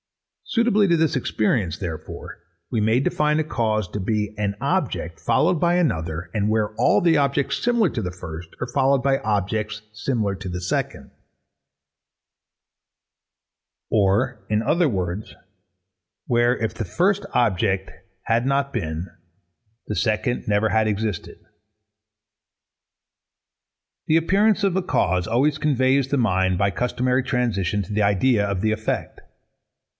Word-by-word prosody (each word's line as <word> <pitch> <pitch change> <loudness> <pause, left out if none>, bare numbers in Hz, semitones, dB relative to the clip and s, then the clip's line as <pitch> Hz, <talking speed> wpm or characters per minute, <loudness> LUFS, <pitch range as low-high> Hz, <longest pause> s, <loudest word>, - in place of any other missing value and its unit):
Suitably 230 -4 +2
to 170 -2 +3
this 160 -2 +1
experience, 110 -8 0
therefore, 85 -5 -7 0.3
we 110 - 0
may 110 +3 +3
define 150 +2 +1
a - - +2
cause 110 - -1
to 105 - -4
be 105 +1 -1
_an 100 -1 -1
object, 85 0 -1
followed 155 +8 +2
by 175 0 +3
another, 85 - -1
and 105 -1 0
where 110 -1 0
all 105 -1 +3
the 170 -2 +3
objects 140 -1 0
similar 235 -4 +3
to 115 - -3
the 90 -3 -3
first 85 -2 -8
are 125 - -3
followed 135 +2 +2
by 135 +1 +2
objects 105 +1 -2
similar 110 -2 -1
to 95 -1 -7
the 90 - -4
second_. 90 0 -3 2.8
Or 105 +3 +1
in 105 0 +1
other 165 +6 +2
words 95 -1 -3 0.9
where, 120 +1 +2
if 110 - -2
the 115 - -4
first 185 - +1
object 100 -5 +1 0.3
had 115 +2 +1
not 140 +1 0
been, 80 -5 -3 0.8
the 105 - -3
second 110 +3 -1
never 105 +1 +2
had 110 0 +2
existed. 105 -3 -3 2.7
The 155 - +4
appearance 200 +5 +2
of 190 -2 +1
a 190 - +2
cause 90 - 0
always 135 +6 +2
conveys 135 -2 +2
the 145 - +1
mind, 95 -6 +2
by 100 - +2
a 95 - -8
customary 125 +1 0
transition, 105 -7 0
to 100 - -8
the 105 0 +1
idea 105 +3 +3
of 100 -2 -2
the 110 0 +1
effect. 110 0 -3
110 Hz, 140 wpm, -23 LUFS, 100-135 Hz, 2.8 s, The